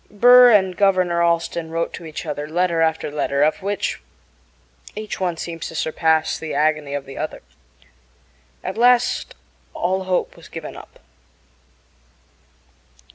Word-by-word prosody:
Burr 245 +4 +7
and 190 -5 +3
Governor 185 -3 +2
Allston 170 -1 0
wrote 165 +1 -2
to 170 - -8
each 155 - -7
other 150 -1 -5
letter 170 0 +1
after 160 -2 0
letter, 145 -1 0
of 155 - +1
which 200 +1 -3 0.9
each 215 0 -6
one 180 -3 -1
seems 165 0 -6
to 165 - -10
surpass 160 0 +1
the 160 - -5
agony 150 -2 0
of 140 -1 -4
the 135 - -9
other. 155 - -5 1.2
At 190 +4 -5
last 245 0 +2 0.4
all 190 +1 -1
hope 185 -1 -1
was - - -15
given - - -8
up. - - -13
170 Hz, 135 wpm, -21 LUFS, 155-190 Hz, 1.2 s, Burr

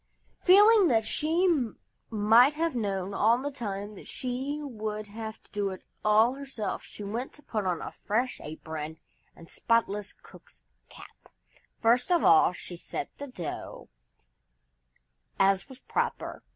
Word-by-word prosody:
Feeling 410 +1 +7
that 225 -6 +2
she 325 +8 +2 0.6
might 225 +6 +5
have 330 -2 -1
known 200 -4 -2
all 225 +4 +4
the 285 +3 -3
time 205 -5 -5
that 200 - -12
she 265 +4 -3
would 215 -6 -4
have 220 +1 -7
to - - -27
do 205 -1 -1
it 190 -1 -8 0.2
all 215 +3 +5
herself, 270 -6 -5
she 210 - -10
went 230 +8 -4
and 295 - -21
put 215 -4 -2
on 175 -3 -1
a - - -6
fresh 240 +5 -2
apron 155 0 -6 0.4
and 165 - -14
spotless 210 -2 0
cook's - - -18 0.3
cap. - - -15 0.5
First 245 +7 +3
of 345 - +4
all 165 +1 +6
she 180 0 -8
set 170 - -5
the 285 - -5
dough, 185 - -7 1.5
as 195 +4 +3
was 260 - -11
proper. - - -2
220 Hz, 145 wpm, -28 LUFS, 200-270 Hz, 1.5 s, Feeling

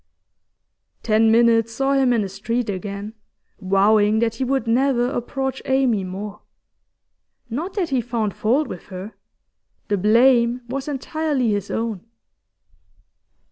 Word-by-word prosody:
Ten 220 0 +3
minutes 230 0 +3
saw 270 +3 0
him 270 -2 +3
in 230 -3 +2
the - - -3
street 215 +4 -2
again, 200 +2 -6 0.5
vowing 205 +2 +3
that 225 0 +1
he 230 - -3
would 265 +1 0
never 245 +1 +2
approach 265 +1 -3
Amy 260 -6 +1
more. 200 +3 -7 1.1
Not 320 - -4
that 365 -5 -1
he 265 -3 +1
found 225 -3 -2
fault 260 +7 +1
with 180 - -9
her; 190 +3 -8 0.8
the 205 -2 +1
blame 235 +3 +4
was 265 +3 -4
entirely 290 -3 -1
his 205 -2 -2
own. 225 -5 -3
230 Hz, 130 wpm, -21 LUFS, 210-265 Hz, 1.1 s, blame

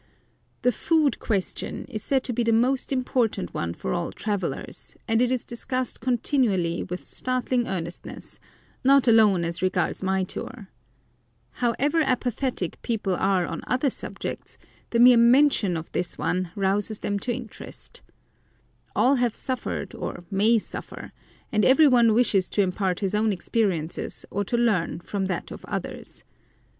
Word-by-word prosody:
The 250 - +4
"Food 310 +4 +1
Question" 200 -5 -3
is 215 -5 -6
said 265 -2 +1
to 250 - -3
be 240 - 0
the 230 -1 +2
most 250 +5 +2
important 250 -6 0
one 85 0 -2
for 65 - -3
all - - -2
travellers, 205 -3 -4
and 225 0 +2
it 250 0 +2
is 255 -2 -1
discussed 255 +1 -3
continually 225 -9 +1
with 180 0 -6
startling 255 -1 -1
earnestness, 175 -2 -6 0.4
not 275 0 +5
alone 210 -6 +5
as 170 +1 -4
regards 185 0 0
my 190 0 +1
tour. 205 +2 -7 0.8
However 280 +6 +1
apathetic 250 - -1
people 210 -5 -1
are 190 -1 +2
on - - -5
other 260 +2 +1
subjects, - - -6 0.3
the 235 - 0
mere 245 +1 +8
mention 235 - +4
of 160 - -7
this 180 -1 -2
one 180 0 -1
rouses 205 +2 0
them 205 - -2
into 205 +5 -2
interest. 240 -2 -8 0.9
All 270 +2 +4
have 245 -2 +1
suffered 260 -2 -4
or - - -6
may 215 +4 +4
suffer, 215 - -7 0.4
and 215 -1 +2
every 285 +4 +6
one 235 -4 +5
wishes 210 -6 +3
to 205 - +2
impart 185 0 -1
his 195 -1 -1
own 215 +1 +2
experience 180 -4 -2
or 205 - -1
to 240 - -1
learn 215 -10 +1
from 195 +1 -3
that 185 -3 -4
of - - -9
others. - - -6
225 Hz, 150 wpm, -25 LUFS, 190-250 Hz, 0.9 s, mere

